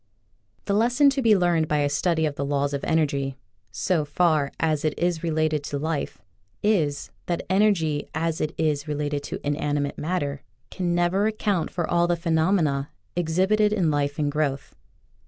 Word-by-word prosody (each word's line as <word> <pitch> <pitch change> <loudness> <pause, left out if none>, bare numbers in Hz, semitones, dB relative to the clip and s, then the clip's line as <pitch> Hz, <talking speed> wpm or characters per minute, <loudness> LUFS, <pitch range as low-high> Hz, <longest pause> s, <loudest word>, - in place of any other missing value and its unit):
The 200 - 0
lesson 245 +7 +4
to 270 0 -1
be 220 -4 +5
learned 170 -3 +2
by 150 - +1
a 145 - +2
study 160 +3 +1
of 150 - -1
the 140 - -4
laws 140 0 0
of 140 - -3
energy 140 -4 0 0.2
— 100 +2 -44 0.2
so 170 -5 +3
far 150 -1 +1
as 155 -2 0
it 155 -1 -1
is 175 -2 0
related 155 -2 0
to 145 - -3
life 155 +1 -3 0.3
— 100 - -42 0.2
is, 145 -2 -3 0.2
that 175 -1 -2
energy 180 -7 +2
as 160 0 -1
it 155 +1 -2
is 155 -2 0
related 145 -1 -2
to - - -5
inanimate 145 -1 -1
matter 145 -4 -2 0.3
can 175 -2 -1
never 175 +4 +2
account 205 -6 -1
for 170 -2 -3
all 175 0 +2
the 175 - +2
phe 165 0 -3
nomena 160 -5 +2 0.3
exhibited 190 +5 +2
in 185 -7 +1
life 145 -1 -1
and 145 -2 0
growth. 145 -2 -2
160 Hz, 180 wpm, -24 LUFS, 145-175 Hz, 0.3 s, be